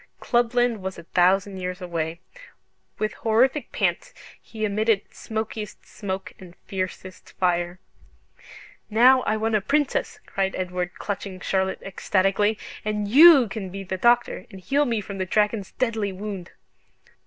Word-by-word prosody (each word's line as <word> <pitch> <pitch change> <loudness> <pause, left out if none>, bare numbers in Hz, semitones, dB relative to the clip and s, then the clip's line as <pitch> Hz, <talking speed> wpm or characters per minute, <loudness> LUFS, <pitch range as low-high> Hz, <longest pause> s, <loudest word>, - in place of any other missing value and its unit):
Clubland 240 -2 +1
was 190 0 -5
a 170 - -9
thousand 190 +3 +2
years 180 0 -4
away. 170 -2 -3 0.8
With 215 0 -1
horrific 250 +6 +1
pants - - -1 0.3
he 220 -1 -4
emitted 215 0 +2
smokiest 220 -1 -5
smoke 195 -2 -5
and 180 -2 -13
fiercest 185 -1 -6
fire. 175 -1 0 1.1
"Now 250 +4 +6
I 220 - +2
want 220 +1 -1
a 215 - +3
Princess," 290 +6 0
cried 190 -1 -1
Edward, 180 -1 -3
clutching 195 -2 -5
Charlotte 190 +1 -1
ecstatically; 195 +2 +1 0.3
"and 210 -1 -2
YOU 280 +2 +8
can 195 -1 -5
be 195 +2 -6
the 190 0 -4
doctor, 240 0 +2
and 190 - -11
heal 280 +10 +1
me 230 -4 0
from 200 -1 -7
the 190 - 0
dragon's 210 +1 0
deadly 225 -5 -1
wound." 190 -2 -6
200 Hz, 140 wpm, -24 LUFS, 185-225 Hz, 1.1 s, YOU